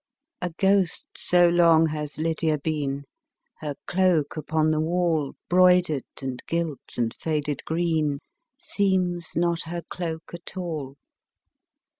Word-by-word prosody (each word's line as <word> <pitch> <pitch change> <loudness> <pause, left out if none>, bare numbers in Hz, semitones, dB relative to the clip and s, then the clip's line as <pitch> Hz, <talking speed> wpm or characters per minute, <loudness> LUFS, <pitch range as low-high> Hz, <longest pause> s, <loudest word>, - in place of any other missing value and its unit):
A 180 - -1
ghost 195 +7 +2
so 175 -1 +4
long 165 -2 +5
has 150 -1 -4
Lydia 160 -1 0
been, 145 -2 -2 0.6
Her 150 -2 -4
cloak 180 -5 +2
upon 155 0 +1
the 155 - +1
wall, 165 -3 0
Broidered, 180 -5 +4 0.2
and 130 -2 -4
gilt, 165 -4 -3
and 115 -2 0
faded 150 -3 -2
green, 160 -3 0 0.4
Seems 185 -7 0
not 170 0 +1
her 170 +1 -5
cloak 165 -2 -5
at 170 +2 -9
all. 155 -7 -4
165 Hz, 120 wpm, -25 LUFS, 150-175 Hz, 0.6 s, long